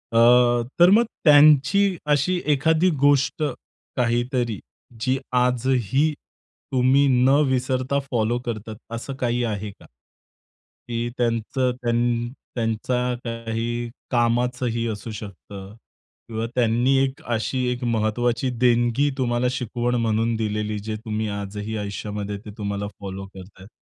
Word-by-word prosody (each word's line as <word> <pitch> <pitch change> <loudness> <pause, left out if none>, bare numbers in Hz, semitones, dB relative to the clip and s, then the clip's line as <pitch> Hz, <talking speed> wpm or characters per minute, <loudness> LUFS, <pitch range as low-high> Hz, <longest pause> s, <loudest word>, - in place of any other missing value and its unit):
अ, - - +3 0.6
तर 175 +1 +8
मग 230 +3 +6 0.2
त्यांची 155 +6 +5 0.2
अशी 175 +6 +1
एखादी 160 +5 +3
गोष्ट 145 +2 +3 0.5
काहीतरी 120 -2 0 0.4
जी 130 +1 +1 0.3
आजही 125 +3 +1 0.6
तुम्ही 130 +2 +4 0.2
न 130 - +5 0.2
विसरता 130 +1 0
फॉलो 120 0 +1
करतात 110 -2 -5 0.2
असं 120 +4 -6
काही 120 0 0
आहे 105 -2 -3
का? - - -19 1.0
की 120 0 -2
त्यांचं 120 +2 0
त्यां 120 0 0 0.3
त्यांचा 115 +1 -1 0.3
काही 115 0 -3 0.2
कामाचंही 120 0 0
असू 110 +1 -5
शकतं 100 -1 -9 0.5
किंवा 110 0 -3
त्यांनी 120 +2 +2
एक 135 +3 -3
अशी 125 +3 -1
एक 125 0 -4
महत्वाची 120 +2 0
देणगी 120 +3 +3
तुम्हाला 120 -1 0
शिकवण 120 -1 -2
म्हणून 115 +1 +1
दिलेली 105 -1 -2
जे 110 +1 -4
तुम्ही 110 0 -2
आजही 105 +2 -5
आयुष्यामध्ये 105 0 -4
ते 105 - -8
तुम्हाला 100 -1 -3
फॉलो 95 -1 -6
करताहेत? 95 0 -13
120 Hz, 115 wpm, -23 LUFS, 110-130 Hz, 1.0 s, तर